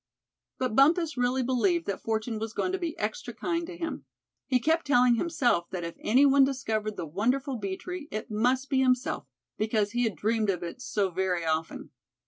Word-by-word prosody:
But 255 -4 -1
Bumpus 315 +4 +4
really 250 +1 +1
believed 295 +8 +1
that 200 - -3
fortune 220 0 -2
was 220 0 -4
going 365 - -1
to 380 - -2
be 340 -1 -3
extra - - -4
kind 335 -1 -2
to 350 -1 -8
him. 330 -1 -4 0.4
He 255 - +3
kept 320 +6 +1
telling 250 -3 +5
himself 240 - +1
that 180 -2 -4
if 170 0 -5
any 255 +6 +4
one 275 0 +6
discovered 220 -6 -1
the - - -3
wonderful 250 - -1
bee 195 -3 -4
tree, 360 -5 -7
it 215 -5 -5
must 250 +5 +1
be 270 -2 +1
himself, 255 - +1 0.3
because 215 -1 +1
he 240 +1 +1
had 220 -5 -1
dreamed 215 +4 0
of 180 -2 -1
it 175 +9 -7
so 205 -6 -1
very 180 -1 -1
often. 160 0 -2
245 Hz, 195 wpm, -28 LUFS, 210-280 Hz, 0.4 s, one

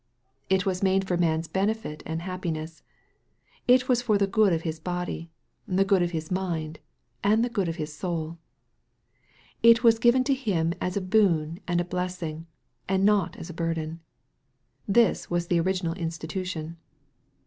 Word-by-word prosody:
It 190 +1 +2
was 185 -2 -1
made 190 0 +2
for 180 - +1
man's 165 -1 +1
benefit 195 -4 -2
and 160 +1 -3
happiness. 165 -3 -4 0.9
It 255 +1 +5
was 245 -2 +3
for 220 -4 +2
the 200 - +3
good 200 0 +3
of 165 -1 0
his 160 -1 -3
body, 175 -1 -4 0.4
the 190 +1 +2
good 195 -2 +3
of 175 - +1
his 160 -1 -5
mind, 165 -5 -2 0.4
and 215 +3 +3
the 245 - -5
good 195 -7 0
of 165 - -3
his 155 -3 -5
soul. 165 -1 -4 1.2
It 230 +1 +6
was 230 -1 +5
given 245 +2 +4
to 275 - +2
him 185 -11 0
as 180 +2 -1
a - - 0
boon 180 -5 +2
and 175 0 +1
a 175 - 0
blessing, 180 -3 -4 0.4
and 190 0 +2
not 205 -2 +2
as 170 - -7
a - - -9
burden. 165 -1 -3 0.9
This 225 +1 +3
was 175 0 -1
the 175 - +3
original 180 -1 0
institution. 165 -1 -4
180 Hz, 165 wpm, -26 LUFS, 165-200 Hz, 1.2 s, It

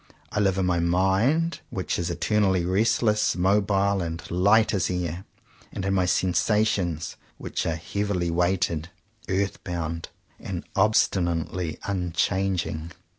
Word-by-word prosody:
I - - -1
live 95 -2 +2
in 95 - +1
my 90 -1 +1
mind, 95 - +2
which 95 - -2
is 85 0 -1
eternally 95 0 +1
restless, 105 +3 +2
mobile, 100 +1 +2
and 85 0 -5
light 100 +6 +4
as 95 - +1
air; 90 0 -3 0.5
and 95 - -4
in 95 - +1
my 95 -2 +2
sensations, 90 -3 +1 0.2
which - - -3
are 80 - 0
heavily 90 +1 -2
weighted, 85 -2 0 0.4
earth 95 +1 -1
bound, 85 -2 -4 0.3
and 90 -3 -5
obstinately 90 -5 +1
un 90 -4 -2
changing. 90 -4 0
95 Hz, 125 wpm, -25 LUFS, 85-100 Hz, 0.5 s, light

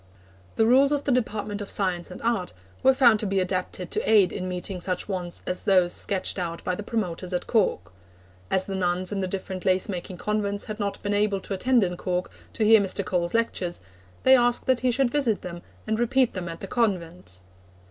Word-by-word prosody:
The 220 - +3
rules 265 +4 +5
of 290 -1 0
the 280 - 0
Department 210 -4 -1
of 205 - -6
Science 180 -3 -1
and 180 - -9
Art 230 -6 -1 0.3
were 265 - +6
found 245 -5 +5
to 210 - -1
be 195 0 +1
adapted 185 -1 -3
to - - -1
aid 205 -4 +5
in 185 - -4
meeting 180 0 -4
such 180 0 -2
wants 180 -3 -4
as 180 - -3
those 185 -3 +3
sketched 195 0 -1
out 170 -2 -4
by 180 - -1
the 180 - -4
promoters 185 -4 -3
at 180 - -1
Cork. 90 - 0 0.6
As 190 - +2
the 195 - -5
nuns 180 0 -1
in 200 - -2
the 185 - -1
different 190 0 -5
lace 185 0 +2
making 180 -1 -5
convents 205 0 -1
had 215 0 -7
not 200 -1 -2
been 205 0 -1
able 205 -1 +1
to 195 - -5
attend 245 +4 +3
in 180 -1 -2
Cork 180 0 -2 0.2
to 220 - 0
hear 220 0 +7
Mr. 200 0 -2
Cole's 180 -1 -1
lectures, 190 -6 -1 0.4
they 265 - +7
asked 245 -1 +2
that 260 -1 +2
he 255 - +1
should 250 0 +1
visit 250 -7 +1
them 175 -1 -7 0.2
and 220 0 -1
repeat 250 +1 +2
them 180 -3 -4
at 165 - -8
the 195 - -5
convents. 180 - -2
195 Hz, 215 wpm, -25 LUFS, 180-225 Hz, 0.6 s, hear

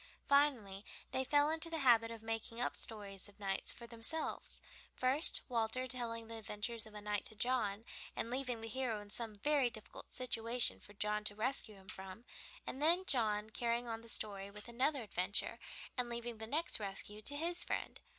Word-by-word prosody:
Finally 250 -9 +3 0.3
they 260 - +1
fell 290 +3 +5
into 325 +1 +2
the 330 - -2
habit 235 -5 +6
of 230 -1 -7
making 225 +1 -2
up 245 - 0
stories 205 -3 -3
of 205 - -20
knights 195 -1 +2
for 235 - -8
themselves, 235 +7 +1 0.4
first 260 +5 +4
Walter 240 +1 0
telling 230 -3 -3
the 230 0 -6
adventures 220 +1 -2
of 215 - -13
a 210 - -6
knight 205 0 0
to 220 - -3
John, 225 -2 +1 0.3
and 230 - -2
leaving 250 -3 -1
the 225 - -4
hero 235 -2 -1
in 205 0 -11
some 225 -2 -1
very 280 +3 +3
difficult 220 -3 -9
situation 240 -1 +3
for 205 - -13
John 210 +1 0
to 205 - -1
rescue 220 -1 +1
him 190 -1 -16
from, 190 +5 -7 0.4
and 265 - -4
then 345 +5 +5
John 220 - +2
carrying 235 +1 0
on 225 -1 -3
the 230 - -8
story 200 -3 0
with 210 +2 -7
another 255 +3 +1
adventure, 200 -1 0 0.4
and 250 -2 0
leaving 235 -1 -4
the 220 - -5
next 310 +3 +1
rescue 205 +1 -4
to 285 +6 -3
his 345 +3 0
friend. - - -2
230 Hz, 190 wpm, -38 LUFS, 210-255 Hz, 0.4 s, habit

